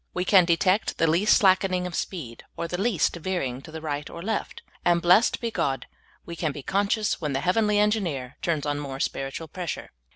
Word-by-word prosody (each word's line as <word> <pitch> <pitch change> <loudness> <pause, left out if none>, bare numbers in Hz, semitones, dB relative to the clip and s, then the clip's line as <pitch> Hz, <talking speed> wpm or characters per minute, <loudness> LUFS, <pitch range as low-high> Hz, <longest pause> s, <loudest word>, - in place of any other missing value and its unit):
We 180 0 -1
can 185 -2 +6
detect 185 +4 +2
the 165 - +3
least 170 +6 +4
slackening 185 -2 +3
of 180 - -5
speed, 150 -11 -5
or 170 - -2
the 180 +2 -3
least 200 -9 +1
veering 155 -8 -3
to 155 - -12
the 160 0 -7
right 145 -2 -4
or 170 - -8
left; 220 +1 -3 0.2
and, 175 -1 +3
blessed 180 +7 +4
be 235 -2 -3
God, 135 - -1 0.4
we 170 - -7
can 160 -2 -1
be 140 -1 -8
conscious 205 - 0
when 150 -3 -2
the 135 - -1
hea^^enly 210 +5 +2
Engineer 195 - 0
turns 160 -4 -1
on 145 0 -1
more 135 -2 -6
spiritual 135 +4 -3
pressure. 175 0 -5
170 Hz, 200 wpm, -25 LUFS, 145-195 Hz, 0.4 s, can